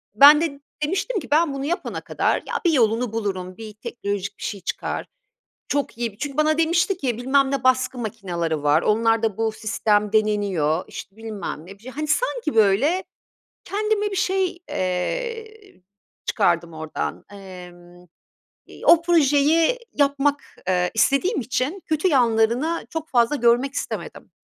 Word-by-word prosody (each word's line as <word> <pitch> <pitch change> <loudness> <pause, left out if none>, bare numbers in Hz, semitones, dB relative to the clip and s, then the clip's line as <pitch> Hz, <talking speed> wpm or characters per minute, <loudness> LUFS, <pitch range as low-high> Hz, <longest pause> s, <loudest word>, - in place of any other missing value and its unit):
Ben 290 +6 +9
de 290 -4 -2 0.2
demiştim 390 +8 -1
ki 275 - -9
ben 310 -1 +3
bunu 275 0 -4
yapana 345 +4 -3
kadar - - 0
ya - - -2
bir 340 - +5
yolunu 230 -2 +2
bulurum, 190 -4 -3
bir 220 -1 -9
teknolojik 200 -2 -5
bir - - -10
şey 200 - -4
çıkar, - - -3 0.6
çok 285 -5 -2
iyi 235 -1 -2
bir 200 - -22
çünkü 285 +1 -5
bana 305 0 +3
demişti 340 +3 +2
ki 250 -9 -2
bilmem 270 +2 +2
ne 275 - -1
baskı 255 0 +2
makinaları 175 -9 -3
var, 150 +3 +4
onlarda 225 -1 +1
bu 225 0 0
sistem 210 -1 0
deneniyor, 200 -7 +1
işte 195 - -9
bilmem 215 -8 -6
ne, 190 - -10
bir 205 - -24
şey... 255 - -8
Hani, 305 +3 -4
sanki, 450 - 0
böyle, 225 - +3 0.6
kendime 420 0 -1
bir 390 - -4
şey, 370 -1 0
eee, 435 - -4 0.4
çıkardım 170 -4 +1
ordan. 160 0 -5
Emm, 180 -2 -12 0.6
iii, - - -11
o 335 -1 +7
projeyi 320 - +3
yapmak, 285 0 +1 0.2
eee, 180 -1 +1
istediğim 280 - +2
için 260 - -2
kötü 310 +4 +1
yanlarını 245 +3 +2
çok 320 -1 -5
fazla 240 +3 +2
görmek 245 +2 +2
istemedim. - - -5
250 Hz, 150 wpm, -23 LUFS, 205-310 Hz, 0.6 s, Ben